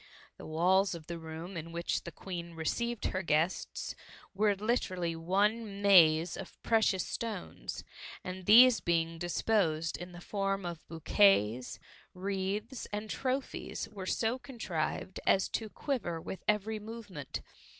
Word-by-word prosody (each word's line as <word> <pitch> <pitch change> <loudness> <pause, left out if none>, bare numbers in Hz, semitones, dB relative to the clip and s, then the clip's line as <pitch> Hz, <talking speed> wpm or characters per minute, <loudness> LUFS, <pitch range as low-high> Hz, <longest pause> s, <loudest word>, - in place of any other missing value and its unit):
The - - -9
walls 180 +4 +3
of 160 -2 -9
the 170 0 -5
room 160 +3 -7
in 165 0 -5
which 170 +1 -2
the 170 - -5
Queen 170 -1 -7
received 235 +8 -1
her 185 - 0
guests, 165 +1 0 0.4
were 205 +1 +3
literally 185 -6 -1
one 200 +7 +2 0.2
Uaze 165 -4 +6
of - - -8
precious 220 -5 +3
stones, 220 -5 -5 0.4
and 185 0 -6
these 235 +1 +9
being 165 -1 0
disposed 170 -2 +1
in 180 +1 -8
the 175 - -10
form 195 0 -2
of 170 -2 -6
bouquets, 155 - +3 0.4
wreaths, 200 +6 -3
and 210 +1 -4
trophies, 265 +1 -2
were 190 -2 -7
so 230 +5 0
contrived 190 - -3
as 190 - +4
to 220 -1 -3
quiver 215 - -2
with 185 - -7
every 210 +1 +1
movement. 210 - -7
190 Hz, 135 wpm, -32 LUFS, 165-210 Hz, 0.4 s, these